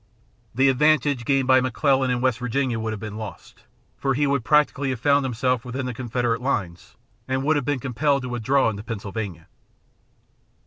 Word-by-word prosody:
The 135 +3 +4
advantage 140 -2 +2
gained 135 -1 +1
by 130 0 +5
McClellan 130 +1 +1
in 125 -1 0
West 130 -1 +1
Virginia 125 -1 -1
would 110 0 -3
have 110 - -5
been 105 0 -7
lost, 110 -3 -10 0.3
for 135 -1 0
he 145 +2 +1
would 140 -3 0
practically 145 0 +2
have 130 -3 -3
found 140 +2 +3
himself 125 -1 0
within 130 +1 -4
the 125 - -3
Confederate 120 0 -2
lines 95 -10 -3 0.3
and 130 0 -1
would 155 +3 +2
have 145 -3 -1
been 145 0 0
compelled 135 +2 0
to 125 - -5
withdraw 125 +3 +1
into 100 -1 -7
Pennsylvania. 100 -5 -6
130 Hz, 180 wpm, -23 LUFS, 115-140 Hz, 0.3 s, by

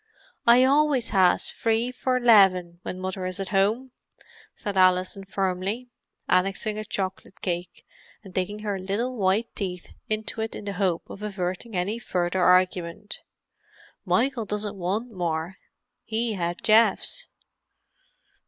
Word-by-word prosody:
"I 240 +2 +7
always 280 -2 +3
has 190 -3 +3
free 230 +2 0
four 255 0 0
'leven 190 -7 +5
when 185 - -6
mother 185 0 -4
is 185 +1 -4
at 195 - -4
home," 215 +7 +1 0.6
said 205 -1 -5
Alison 185 +1 +3
firmly, 195 +5 -2 0.4
annexing 195 +3 +1
a - - -3
chocolate 195 -2 -5
cake 175 -1 -4 0.4
and 190 -3 -12
digging 205 +4 -3
her 200 -2 -1
little 210 +7 -2
white 205 +2 0
teeth 180 -3 -5 0.2
into 215 +1 -2
it 220 - -3
in - - -8
the 200 - -3
hope 185 -4 -1
of 200 - -10
averting 195 +1 -4
any 195 +6 -1
further 180 -4 -1
argument. 180 +2 +1 0.8
"Michael 245 -2 +1
doesn't 210 0 -3
want 200 +6 -2
more, 175 -1 -3 0.5
he 225 0 -1
had 175 -2 -3
Geoff's." 225 - +3
195 Hz, 135 wpm, -25 LUFS, 185-225 Hz, 0.8 s, I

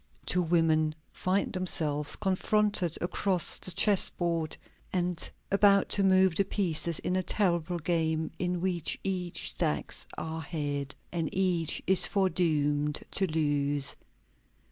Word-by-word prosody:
Two 180 - +2
women 160 -2 +2 0.2
find 190 +2 -1
themselves 155 -5 0
confronted 200 -2 +1
across 180 0 +2
the - - -4
chessboard 170 -4 +1 0.3
and 180 -2 -2 0.2
about 200 0 +4
to 200 - +2
move 190 -1 +4
the 200 - +3
pieces 170 -4 0
in 180 - -2
a 185 - +2
terrible 175 -2 0
game 160 -1 -1
in 180 -1 -1
which 175 -3 -1
each 180 -3 -2
stakes 75 -1 -2
her 160 0 -4
head, 145 -3 -4 0.2
and 165 -3 -2
each 180 -4 +1
is 190 0 +4
foredoomed 150 -6 0
to 195 - +1
lose. 145 -3 0
175 Hz, 120 wpm, -29 LUFS, 155-185 Hz, 0.3 s, about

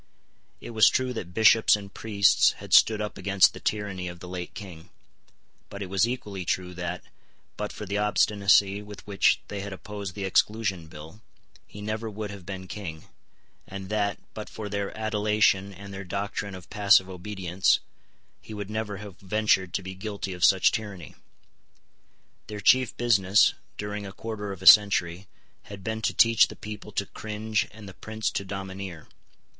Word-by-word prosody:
It - - -8
was 110 -2 +6
true 130 -1 0
that 90 -7 -6
bishops 110 +2 +5
and 100 -1 -9
priests 100 -3 +3
had - - -8
stood 110 -1 +6
up 105 -1 -5
against 100 0 +4
the - - -9
tyranny 100 -4 -3
of 85 0 -8
the 90 - -10
late 90 -1 -6
King: 90 -6 -10 0.8
but 100 0 -6
it 95 - -9
was 95 +3 +3
equally 105 -6 -5
true 90 +1 -2
that, 90 0 -5 0.5
but - - -4
for 105 - -7
the 100 +1 -2
obstinacy 100 -1 +3
with 105 -1 -11
which 100 -2 +2
they 100 - -5
had 100 0 -6
opposed 100 -1 -7
the 100 - -5
Exclusion 95 -2 0
Bill, 80 +6 -12 0.5
he 105 - -11
never 110 +1 -3
would 105 -1 -6
have 100 -3 -11
been 95 -1 -6
King, 85 -6 -7 0.6
and 95 -1 -8
that, 105 -1 0 0.2
but 105 - -7
for 105 -2 -7
their 100 -1 -3
adulation 105 -2 +1
and 100 +1 -10
their 95 +1 -6
doctrine 100 +1 -4
of 90 -1 -13
passive 100 -2 +5
obedience, 95 0 0 0.6
he 110 - -9
would 105 0 -6
never 110 -2 -3
have 100 -2 -10
ventured 100 -2 +1
to - - -2
be 95 +1 -6
guilty 100 0 -5
of 90 - -6
such 95 -1 +5
tyranny. 100 -7 -6 1.3
Their 105 -1 -6
chief 130 +3 +3
business, 105 -4 +4 0.2
during 105 0 -5
a - - -8
quarter 105 -1 -6
of 95 -1 -8
a - - -8
century, 95 -3 +6 0.4
had 100 -2 -10
been 110 +2 -3
to - - 0
teach 115 -1 +6
the - - -10
people 105 0 -8
to 100 - -1
cringe 110 +1 -3
and 105 -1 -12
the 95 - -10
prince 110 +3 -4
to - - -3
domineer. 95 -3 -7
100 Hz, 175 wpm, -26 LUFS, 95-105 Hz, 1.3 s, was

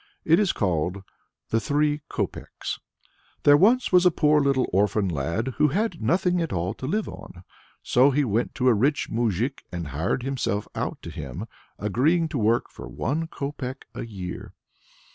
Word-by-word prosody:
It 165 +3 +5
is 205 -4 +3
called 90 0 -1 0.5
THE 115 - +2
THREE 150 +5 +1
COPECKS. - - -4 0.6
There 145 - +8
once 230 +11 +4
was 180 -1 +6
a 180 - +7
poor 150 -2 +3
little 135 -2 +2
orphan 100 +1 +2
lad 85 - -1
who 150 - +6
had 190 +4 -1
nothing 180 0 +2
at 165 - -2
all 90 +1 -1
to 130 - -6
live 215 +8 0
on; 90 - -10 0.4
so 130 +3 +4
he 145 +1 +2
went 115 +1 -1
to 130 - +1
a 125 - +7
rich 135 +8 +1
moujik 115 +3 0
and 85 -4 -5
hired 80 - -1
himself 125 -6 -2
out - - -3
to - - -7
him, - - -6 0.3
agreeing 150 - +1
to 145 -5 -2
work 115 +2 +2
for - - -10
one 135 - -2
copeck 140 -3 -5
a - - -5
year. 95 -6 -7
130 Hz, 170 wpm, -25 LUFS, 100-150 Hz, 0.6 s, There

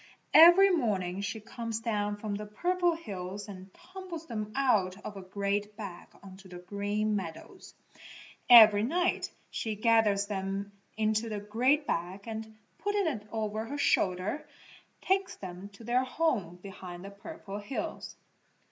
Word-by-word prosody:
Every 350 +5 +9
morning 200 - 0
she 200 +2 -3
comes 230 +1 -5
down 210 -3 -1
from 210 0 -4
the 210 +1 -5
Purple 350 - +1
Hills 200 - -6
and 190 -1 -10
tumbles 365 - -9
them 215 -6 -5
out 210 -9 +2
of 205 - -6
a 195 - -7
great 200 +2 -2
bag 195 -5 -8 0.2
on 190 -1 -11
to 195 0 -15
the 180 -1 -9
Green 205 +3 -2
Meadows. 170 -5 -7 0.7
Every 220 -4 +10
night 350 +10 0 0.2
she 220 -2 -3
gathers 215 -2 +3
them 195 0 -3 0.3
into 220 +1 +1
the 210 -1 -3
great 250 +9 +1
bag 180 -2 -2
and, 220 -1 -6 0.2
putting 410 0 0
it 215 -10 -3
over 220 0 -2
her 285 - -5
shoulder, 190 0 +1 0.5
takes 385 +1 0
them 185 +1 -8
to 200 - -13
their 245 +3 +2
home 255 - -1
behind 185 -2 -9
the 200 - -8
Purple 200 -1 -8
Hills. 205 +6 -5
210 Hz, 145 wpm, -30 LUFS, 200-245 Hz, 0.7 s, Every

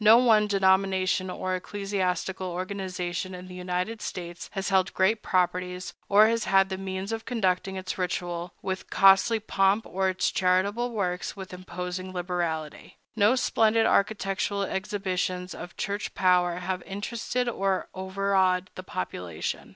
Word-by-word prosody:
No 220 +2 +9
one 220 -4 +5
denomination 190 -1 +2
or 185 0 -3
ecclesiastical 190 -1 -2
organization 185 -1 -4
in 180 0 -9
the 180 - -10
United 180 +4 -3
States 175 -1 -6
has 195 0 -2
held 190 -1 +2
great 210 +4 +2
properties, 180 0 -1 0.2
or 205 +2 +7
has 230 0 0
had 195 0 +4
the 190 - -3
means 190 +1 -4
of 225 0 -3
conducting 190 -5 0
its 185 0 -5
ritual 175 -1 -2
with 190 -1 -4
costly 195 +4 +5
pomp 200 0 +2
or 190 0 0
its 185 -1 0
charitable 200 +6 +1
works 185 -6 -2
with 190 -2 -8
imposing 180 0 -5
liberality. 170 -4 -3 0.2
No 215 +3 +4
splendid 225 -3 +3
architectural 200 0 +1
exhibitions 185 -2 -2
of 175 - -9
Church 200 -1 -3
power 180 -2 +3
have 180 +1 -3
interested 230 +6 -3
or 195 -5 0
overawed 190 -1 +1
the - - -7
population. 90 - -4
190 Hz, 140 wpm, -27 LUFS, 180-200 Hz, 0.2 s, No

